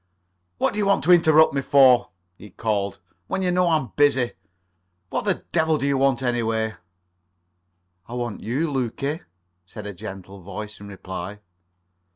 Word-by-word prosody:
"What -, -, +1 dB
do 210 Hz, -, -3 dB
you 205 Hz, -, +1 dB
want 200 Hz, -, +2 dB
to 180 Hz, -, +4 dB
interrupt 160 Hz, -3 st, +6 dB
me 140 Hz, -, 0 dB
for," 130 Hz, -3 st, +5 dB, 0.3 s
he 105 Hz, -, -13 dB
called, 100 Hz, -1 st, -2 dB, 0.3 s
"when 190 Hz, -, -2 dB
you 180 Hz, -, +1 dB
know 180 Hz, 0 st, +2 dB
I'm 155 Hz, -8 st, 0 dB
busy? 135 Hz, -4 st, +3 dB, 0.8 s
What -, -, -2 dB
the -, -, 0 dB
devil 160 Hz, -2 st, +2 dB
do 140 Hz, -, -2 dB
you 140 Hz, 0 st, +2 dB
want, 135 Hz, -1 st, +2 dB
anyway?" 115 Hz, -3 st, 0 dB, 1.3 s
"I 120 Hz, -, -7 dB
want 120 Hz, -3 st, -4 dB
you, 135 Hz, +9 st, -1 dB
Lukie," 140 Hz, +4 st, -2 dB, 0.5 s
said -, -, -9 dB
a 105 Hz, -, -5 dB
gentle 95 Hz, -1 st, -9 dB
voice 105 Hz, +3 st, -8 dB
in 100 Hz, -, -10 dB
reply. 100 Hz, +1 st, -7 dB
125 Hz, 160 wpm, -23 LUFS, 105-150 Hz, 1.3 s, interrupt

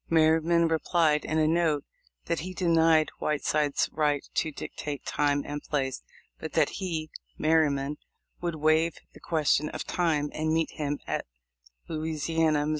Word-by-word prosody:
Merryman 165 Hz, +1 st, +4 dB
replied 160 Hz, -1 st, +2 dB
in 155 Hz, -, -1 dB
a 155 Hz, -1 st, +3 dB
note, 160 Hz, -3 st, +2 dB, 0.4 s
that 170 Hz, -, -1 dB
he 185 Hz, +3 st, -6 dB
denied 165 Hz, -3 st, +3 dB
Whiteside's 150 Hz, -1 st, +1 dB
right 145 Hz, -2 st, +1 dB
to 160 Hz, -, 0 dB
dictate 145 Hz, 0 st, -6 dB
time 145 Hz, -1 st, +1 dB
and 145 Hz, 0 st, -5 dB
place, 135 Hz, -3 st, -2 dB, 0.4 s
but -, -, -6 dB
that -, -, +3 dB
he 160 Hz, -4 st, -3 dB, 0.3 s
(Merry 160 Hz, -1 st, +4 dB
man) 140 Hz, +1 st, -3 dB, 0.4 s
would 170 Hz, -2 st, -2 dB
waive 155 Hz, +2 st, +2 dB, 0.2 s
the -, -, -14 dB
question 150 Hz, -2 st, +1 dB
of -, -, -5 dB
time, 155 Hz, -4 st, 0 dB
and 155 Hz, 0 st, -1 dB
meet 160 Hz, 0 st, +1 dB
him 145 Hz, -1 st, -2 dB
at -, -, -3 dB, 0.6 s
Louisiana, 155 Hz, -1 st, 0 dB
Mo. -, -, -1 dB
155 Hz, 150 wpm, -28 LUFS, 150-165 Hz, 0.6 s, Merryman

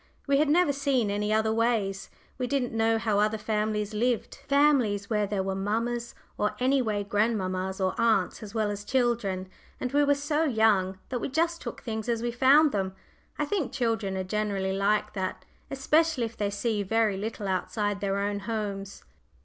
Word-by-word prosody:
We 280 Hz, -1 st, +3 dB
had 300 Hz, -1 st, +3 dB
never 325 Hz, -1 st, +4 dB
seen 265 Hz, -6 st, +1 dB
any 210 Hz, +1 st, -1 dB
other 220 Hz, 0 st, +2 dB
"ways;" 220 Hz, -4 st, 0 dB, 0.3 s
we 250 Hz, -, -1 dB
didn't 255 Hz, -3 st, -1 dB
know 225 Hz, 0 st, +2 dB
how 215 Hz, -2 st, +1 dB
other 215 Hz, +1 st, +2 dB
families 210 Hz, -1 st, -1 dB
lived 235 Hz, +2 st, -1 dB
families 265 Hz, -9 st, +3 dB
where 210 Hz, -1 st, +1 dB
there 195 Hz, -1 st, -1 dB
were 195 Hz, 0 st, -2 dB
mammas, 230 Hz, +5 st, -2 dB, 0.2 s
or 210 Hz, -, 0 dB
any 260 Hz, +2 st, +3 dB
way 210 Hz, -4 st, -1 dB
grandmammas, 190 Hz, -3 st, -1 dB
or 190 Hz, -1 st, +1 dB
aunts, 220 Hz, -5 st, +2 dB
as 215 Hz, 0 st, -9 dB
well 215 Hz, -2 st, +1 dB
as 205 Hz, 0 st, -5 dB
children, 220 Hz, -6 st, 0 dB, 0.3 s
and 250 Hz, -, -3 dB
we 290 Hz, +1 st, +3 dB
were 285 Hz, 0 st, +4 dB
so 295 Hz, +2 st, 0 dB
young 220 Hz, -8 st, +2 dB
that 250 Hz, -, -2 dB
we -, -, -2 dB
just 335 Hz, +4 st, 0 dB
took -, -, -7 dB
things 220 Hz, -1 st, -4 dB
as 230 Hz, -1 st, 0 dB
we 240 Hz, -, 0 dB
found 275 Hz, +5 st, +5 dB
them. 190 Hz, -3 st, -2 dB, 0.4 s
I 300 Hz, -, 0 dB
think 310 Hz, -5 st, -1 dB
children 225 Hz, -6 st, -1 dB
are 190 Hz, -, -1 dB
generally 195 Hz, -1 st, -1 dB
like 200 Hz, +2 st, +1 dB
that, 190 Hz, -2 st, -4 dB, 0.2 s
especially 300 Hz, +1 st, +2 dB
if 225 Hz, -, -7 dB
they 205 Hz, -1 st, -1 dB
see 205 Hz, +1 st, -1 dB
very 215 Hz, +1 st, +1 dB
little 210 Hz, +1 st, -4 dB
outside 205 Hz, +2 st, -1 dB
their 200 Hz, -1 st, 0 dB
own 205 Hz, 0 st, -1 dB
homes. 200 Hz, -2 st, -4 dB
220 Hz, 185 wpm, -27 LUFS, 200-250 Hz, 0.4 s, found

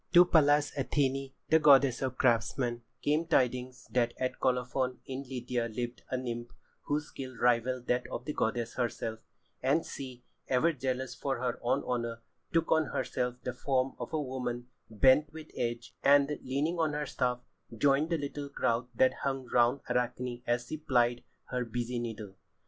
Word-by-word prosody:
To 175 Hz, 0 st, +9 dB
Pallas 145 Hz, -3 st, +4 dB
Athené, 135 Hz, -1 st, 0 dB, 0.3 s
goddess 140 Hz, -3 st, +6 dB
of 130 Hz, -1 st, -2 dB
craftsmen, 120 Hz, 0 st, +1 dB, 0.2 s
came 155 Hz, +3 st, +1 dB
tidings 125 Hz, -4 st, 0 dB
that 120 Hz, -1 st, +1 dB
at 130 Hz, 0 st, -2 dB
Colophon 125 Hz, 0 st, 0 dB
in 130 Hz, 0 st, -4 dB
Lydia 125 Hz, -2 st, -2 dB
lived 120 Hz, +2 st, -4 dB
a 130 Hz, -, -1 dB
nymph 120 Hz, -2 st, -4 dB, 0.4 s
whose 150 Hz, +1 st, -1 dB
skill 130 Hz, -2 st, -8 dB
rivalled 125 Hz, +1 st, +2 dB
that 125 Hz, 0 st, 0 dB
of 125 Hz, -, -6 dB
the 150 Hz, -, -3 dB
goddess 115 Hz, -1 st, -1 dB
herself, 115 Hz, -2 st, -2 dB, 0.4 s
and 140 Hz, +5 st, +2 dB
she, 130 Hz, -3 st, -8 dB, 0.2 s
ever 145 Hz, +6 st, +3 dB
jealous 130 Hz, -1 st, -2 dB
for 135 Hz, -2 st, -2 dB
her 125 Hz, -1 st, -2 dB
own 120 Hz, -, +1 dB
honour, 115 Hz, -1 st, -2 dB, 0.3 s
took 165 Hz, -1 st, +1 dB
on 160 Hz, -1 st, +4 dB
herself 125 Hz, -2 st, -2 dB
the 125 Hz, -, -3 dB
form 130 Hz, +1 st, 0 dB
of -, -, -5 dB
a 155 Hz, -, 0 dB
woman 125 Hz, -3 st, -4 dB, 0.2 s
bent 130 Hz, +7 st, +4 dB
with 160 Hz, -1 st, -10 dB
age, 120 Hz, -1 st, -3 dB
and, 140 Hz, +1 st, +4 dB
leaning 150 Hz, +6 st, -1 dB
on 155 Hz, -2 st, +1 dB
her 150 Hz, 0 st, -1 dB
staff, 125 Hz, -2 st, -1 dB, 0.4 s
joined 140 Hz, +5 st, +3 dB
the 165 Hz, -, +1 dB
little 145 Hz, -1 st, -5 dB
crowd 120 Hz, -3 st, 0 dB
that 130 Hz, +2 st, +4 dB
hung 135 Hz, -1 st, -1 dB
round 120 Hz, +3 st, +4 dB
Arachne 125 Hz, 0 st, -1 dB
as 120 Hz, 0 st, +1 dB
she 155 Hz, -, -5 dB
plied 120 Hz, -5 st, +2 dB, 0.3 s
her 125 Hz, 0 st, 0 dB
busy 120 Hz, +1 st, -3 dB
needle. 110 Hz, -4 st, -5 dB
130 Hz, 165 wpm, -31 LUFS, 120-140 Hz, 0.4 s, To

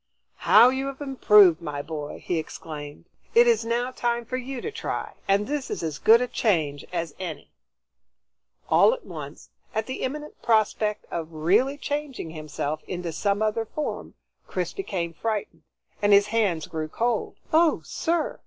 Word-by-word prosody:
"How 240 Hz, -, +9 dB
you 265 Hz, +1 st, -2 dB
have 275 Hz, -1 st, -6 dB
improved, 210 Hz, -, +5 dB
my 145 Hz, -3 st, -4 dB
boy!" 150 Hz, -2 st, -6 dB
he 175 Hz, -, 0 dB
exclaimed. 150 Hz, -1 st, -8 dB, 0.3 s
"It 235 Hz, +1 st, +8 dB
is 230 Hz, -2 st, +3 dB
now 240 Hz, +2 st, -1 dB
time 240 Hz, -1 st, -1 dB
for 255 Hz, -, -4 dB
you 255 Hz, 0 st, -4 dB
to 440 Hz, -, -4 dB
try, -, -, -4 dB
and 200 Hz, +1 st, +3 dB
this 285 Hz, +1 st, -3 dB
is -, -, -4 dB
as 155 Hz, -2 st, -3 dB
good 230 Hz, +2 st, +6 dB
a 250 Hz, -, 0 dB
change 155 Hz, -, 0 dB
as 170 Hz, -4 st, -3 dB
any." 170 Hz, -5 st, -6 dB, 1.2 s
All -, -, +5 dB
at -, -, -15 dB
once, -, -, -9 dB, 0.2 s
at 220 Hz, 0 st, 0 dB
the 260 Hz, +2 st, -5 dB
imminent 300 Hz, +3 st, -5 dB
prospect 215 Hz, -1 st, +1 dB
of 165 Hz, -1 st, -4 dB
really 200 Hz, -, +2 dB
changing 290 Hz, -, -4 dB
himself 155 Hz, -1 st, -4 dB
into 175 Hz, -2 st, -4 dB
some 200 Hz, +6 st, 0 dB
other 215 Hz, +1 st, 0 dB
form, 295 Hz, +7 st, -5 dB, 0.3 s
Chris -, -, -3 dB
became 180 Hz, -, -3 dB
frightened 205 Hz, -4 st, -3 dB, 0.4 s
and 205 Hz, 0 st, +4 dB
his 200 Hz, 0 st, +7 dB
hands 195 Hz, -9 st, +1 dB
grew 155 Hz, -1 st, -4 dB
cold. 230 Hz, +7 st, -1 dB, 0.2 s
"Oh, 325 Hz, 0 st, +4 dB
sir! 335 Hz, -1 st, -1 dB
210 Hz, 160 wpm, -25 LUFS, 165-250 Hz, 1.2 s, How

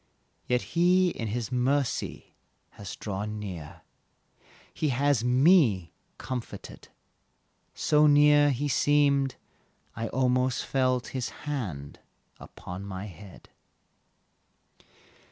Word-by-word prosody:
Yet 125 Hz, 0 st, +1 dB
He 180 Hz, +2 st, +4 dB
in 115 Hz, -7 st, -5 dB, 0.2 s
mercy 130 Hz, +2 st, -1 dB, 0.4 s
has 100 Hz, -2 st, -8 dB
drawn 105 Hz, +1 st, -5 dB
near, 90 Hz, -8 st, -8 dB, 0.9 s
He 155 Hz, -, -1 dB
has 135 Hz, -1 st, +1 dB
me 125 Hz, -, +3 dB, 0.2 s
comforted 125 Hz, -2 st, -7 dB, 0.9 s
So 150 Hz, 0 st, +3 dB
near 145 Hz, 0 st, +5 dB
He 140 Hz, +2 st, -1 dB
seemed 140 Hz, -1 st, +2 dB, 0.6 s
I 115 Hz, -, -3 dB
almost 125 Hz, +1 st, 0 dB
felt 130 Hz, -2 st, 0 dB
His 130 Hz, -2 st, -3 dB, 0.2 s
hand 95 Hz, -, -5 dB, 0.4 s
upon 90 Hz, +2 st, -9 dB
my 100 Hz, 0 st, -6 dB
head. 95 Hz, 0 st, -13 dB
125 Hz, 90 wpm, -27 LUFS, 105-145 Hz, 0.9 s, near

